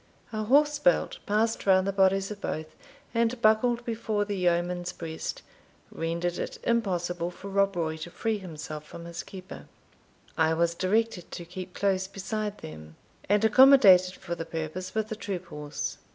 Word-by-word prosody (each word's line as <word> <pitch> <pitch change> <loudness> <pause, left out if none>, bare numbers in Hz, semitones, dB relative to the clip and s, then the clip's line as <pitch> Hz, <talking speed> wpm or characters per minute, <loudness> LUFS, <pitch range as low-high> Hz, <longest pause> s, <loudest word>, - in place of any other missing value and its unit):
A 215 0 -2
horse 295 +5 +4
belt, - - +2
passed 215 +1 +1
round 190 -1 +5
the 200 - +1
bodies 195 +1 +3
of 205 -1 -7
both, 155 0 -4 0.4
and 235 +1 +1
buckled 235 +2 +3
before 220 -3 -1
the 205 0 -3
yeoman's 175 0 0
breast, 160 -1 -6 0.5
rendered 170 +1 -2
it - - -4
impossible 180 -7 0
for 190 +2 -9
Rob 195 0 +2
Roy 160 -2 -1
to 160 +2 -7
free 215 +5 -2
himself 155 -4 -7
from 170 +2 -10
his 170 0 -6
keeper. 185 -1 -10 0.7
I 160 0 +3
was 170 +1 +2
directed 200 +1 0
to 175 - -7
keep 180 +1 -8
close 190 -1 +1
beside 210 +2 -4
them, 75 0 -10 0.3
and 205 +2 +4
accommodated 210 -7 +7
for 175 - -6
the 165 - -4
purpose 165 +4 -5
with 220 0 -1
a - - -1
troop 195 -4 -5
horse. 150 0 -5
185 Hz, 165 wpm, -28 LUFS, 170-215 Hz, 0.7 s, accommodated